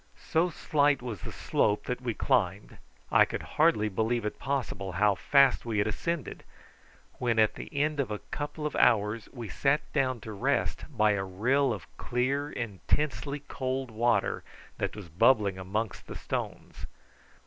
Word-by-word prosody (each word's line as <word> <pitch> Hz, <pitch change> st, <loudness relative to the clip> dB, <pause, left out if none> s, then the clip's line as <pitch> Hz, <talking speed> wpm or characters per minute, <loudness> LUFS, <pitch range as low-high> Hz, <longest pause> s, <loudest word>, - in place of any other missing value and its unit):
So 165 Hz, +3 st, +3 dB
slight 145 Hz, -4 st, +1 dB
was 110 Hz, -8 st, -5 dB
the -, -, -6 dB
slope 105 Hz, -1 st, +1 dB
that 125 Hz, 0 st, -3 dB
we 120 Hz, -3 st, -2 dB
climbed 100 Hz, -2 st, 0 dB, 0.3 s
I -, -, +7 dB
could -, -, -3 dB, 0.2 s
hardly 155 Hz, -10 st, +4 dB
believe 110 Hz, +3 st, 0 dB
it 105 Hz, -, -4 dB
possible 115 Hz, -9 st, -2 dB
how 105 Hz, +3 st, +3 dB
fast 140 Hz, +6 st, +4 dB
we 115 Hz, -3 st, -2 dB
had 100 Hz, -, +3 dB
ascended, 165 Hz, +8 st, -3 dB, 0.8 s
when 120 Hz, -2 st, +1 dB
at 110 Hz, -1 st, +4 dB
the -, -, -8 dB
end 150 Hz, 0 st, 0 dB
of 135 Hz, -, 0 dB
a 105 Hz, -, -2 dB
couple 145 Hz, +6 st, -5 dB
of 150 Hz, -, -2 dB
hours 110 Hz, -1 st, +3 dB
we 120 Hz, -4 st, -7 dB
sat 140 Hz, +9 st, +1 dB
down 130 Hz, -4 st, +1 dB
to 110 Hz, -, -7 dB
rest 100 Hz, -, 0 dB
by 110 Hz, 0 st, +3 dB
a 100 Hz, -2 st, 0 dB
rill 125 Hz, +9 st, +1 dB
of 100 Hz, -6 st, -5 dB
clear 135 Hz, +4 st, -1 dB
intensely 140 Hz, +6 st, -2 dB
cold 130 Hz, -2 st, -3 dB
water 115 Hz, -2 st, +1 dB, 0.4 s
that -, -, -2 dB
was 105 Hz, -4 st, -8 dB
bubbling 100 Hz, +2 st, +3 dB
amongst 100 Hz, +3 st, -3 dB
the -, -, -7 dB
stones. -, -, -5 dB
120 Hz, 160 wpm, -29 LUFS, 105-140 Hz, 0.8 s, I